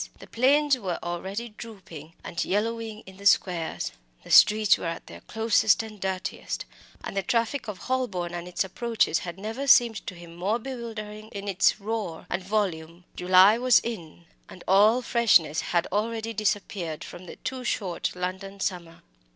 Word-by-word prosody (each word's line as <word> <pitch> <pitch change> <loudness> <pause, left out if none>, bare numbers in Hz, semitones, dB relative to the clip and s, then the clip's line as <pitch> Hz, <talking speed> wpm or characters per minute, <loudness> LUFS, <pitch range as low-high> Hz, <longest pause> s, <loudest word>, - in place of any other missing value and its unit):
The - - -12
planes 280 +3 +3
were 185 -5 -3
already 190 +7 -4
drooping 185 -8 -11
and 170 - -3
yellowing 220 +1 -2
in 190 0 -13
the 200 - -12
squares, 175 -5 +1 0.3
the - - -10
streets 215 -1 +7
were - - -5
at 165 - -5
their - - -11
closest 220 -1 +2
and 215 -2 -10
dirtiest, 190 -1 -3 0.4
and - - -6
the 195 - +1
traffic 230 +6 -1
of 210 -3 -5
Holborn 200 -10 -2
and 175 0 -5
its 180 +2 -1
approaches 220 -3 0
had 175 0 -7
never 225 +8 -5
seemed 235 -4 +6
to 185 - -5
him 170 -1 -12
more 195 +6 0
bewildering 220 -4 -7
in 205 -2 -7
its 195 +2 +2
roar 210 -5 -4
and 175 - -1
volume. 180 -4 -2
July 185 +5 +6
was 250 -1 +5
in, 175 -7 -5 0.2
and 180 - -12
all 215 +6 +5
freshness 195 -11 +3
had 170 -1 0
already 225 +2 -2
disappeared 200 -6 -2
from 180 +1 -10
the - - -9
too 260 -1 -5
short 190 -9 -2
London 190 +2 -5
summer. 175 -4 -4
200 Hz, 165 wpm, -26 LUFS, 180-225 Hz, 0.4 s, streets